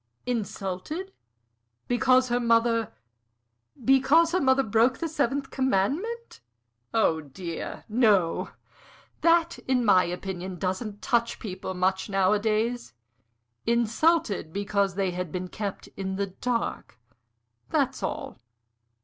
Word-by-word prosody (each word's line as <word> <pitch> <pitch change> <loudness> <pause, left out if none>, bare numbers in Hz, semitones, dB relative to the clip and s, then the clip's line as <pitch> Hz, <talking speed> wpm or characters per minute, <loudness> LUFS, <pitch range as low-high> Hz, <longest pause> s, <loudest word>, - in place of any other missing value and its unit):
"Insulted? 240 - -4 0.7
Because 255 +1 +3
her 240 0 +1
mother 230 -1 +2 0.4
" 115 - -23
"Because 290 +5 +5
her 365 - +1
mother 265 0 +4
broke 230 +3 +2
the 335 - -2
seventh 280 -3 -1
commandment? 280 - -1 0.5
Oh, 165 -8 +2
dear, 165 +4 -7
no! 210 -7 +2 0.7
That, 335 0 +3
in 250 -2 +2
my 185 -3 +5
opinion, 180 +1 -5
doesn't 200 +3 -3
touch 235 -2 +1
people 190 -2 -6
much 190 +2 0
nowadays. 215 - +1 0.7
Insulted 235 - +2
because 200 0 0
they 190 -2 0
had 180 -2 -4
been 180 +1 -4
kept 205 -1 -5
in 190 -1 -3
the 200 +1 0 0.2
dark 235 - -2 0.7
that's - - 0
all. - - -4
220 Hz, 110 wpm, -27 LUFS, 190-255 Hz, 0.7 s, Because